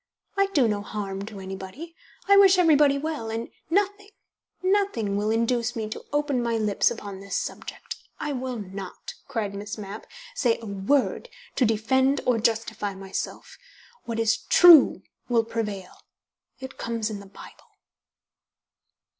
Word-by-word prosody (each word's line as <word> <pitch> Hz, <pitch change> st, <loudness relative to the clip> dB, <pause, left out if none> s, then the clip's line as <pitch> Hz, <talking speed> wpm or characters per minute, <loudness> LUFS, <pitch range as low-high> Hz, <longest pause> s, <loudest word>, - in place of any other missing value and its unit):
I 395 Hz, 0 st, +3 dB
do 290 Hz, -11 st, +2 dB
no 205 Hz, -2 st, -1 dB
harm 200 Hz, -1 st, -5 dB
to 210 Hz, -3 st, -8 dB
anybody, 190 Hz, -, -8 dB, 0.3 s
I 400 Hz, -, +7 dB
wish 390 Hz, -2 st, +7 dB
everybody 300 Hz, -5 st, +5 dB
well, 290 Hz, -6 st, -4 dB
and 225 Hz, +1 st, -4 dB, 0.2 s
nothing 405 Hz, +3 st, 0 dB, 0.5 s
nothing 370 Hz, -, +1 dB
will 205 Hz, +1 st, 0 dB
induce 235 Hz, +2 st, 0 dB
me 220 Hz, -2 st, -3 dB
to -, -, -7 dB
open 290 Hz, -3 st, 0 dB
my 235 Hz, -1 st, 0 dB
lips 210 Hz, -2 st, +2 dB
upon 205 Hz, -4 st, -7 dB
this 200 Hz, 0 st, -3 dB
subject. -, -, -6 dB, 0.2 s
I 295 Hz, -, -3 dB
will 255 Hz, -1 st, -4 dB
not," 195 Hz, -2 st, -8 dB
cried 225 Hz, -7 st, -3 dB
Miss 205 Hz, +1 st, -6 dB
Mapp, 205 Hz, 0 st, -8 dB, 0.3 s
"say 235 Hz, -3 st, +1 dB
a 230 Hz, -, -10 dB
word 215 Hz, -, 0 dB, 0.3 s
to 255 Hz, -, +3 dB
defend 260 Hz, +5 st, +2 dB
or 245 Hz, -2 st, +2 dB
justify 220 Hz, -3 st, -1 dB
myself. 190 Hz, 0 st, -6 dB, 0.5 s
What 230 Hz, -1 st, -3 dB
is 225 Hz, 0 st, +2 dB
true 345 Hz, -5 st, +8 dB, 0.3 s
will 235 Hz, -2 st, +3 dB
prevail. 210 Hz, -5 st, -4 dB, 0.7 s
It 265 Hz, 0 st, -9 dB
comes 230 Hz, -2 st, -2 dB
in 205 Hz, -, -5 dB
the 200 Hz, -, -12 dB
Bible." 195 Hz, -, -15 dB
230 Hz, 145 wpm, -25 LUFS, 205-280 Hz, 0.7 s, true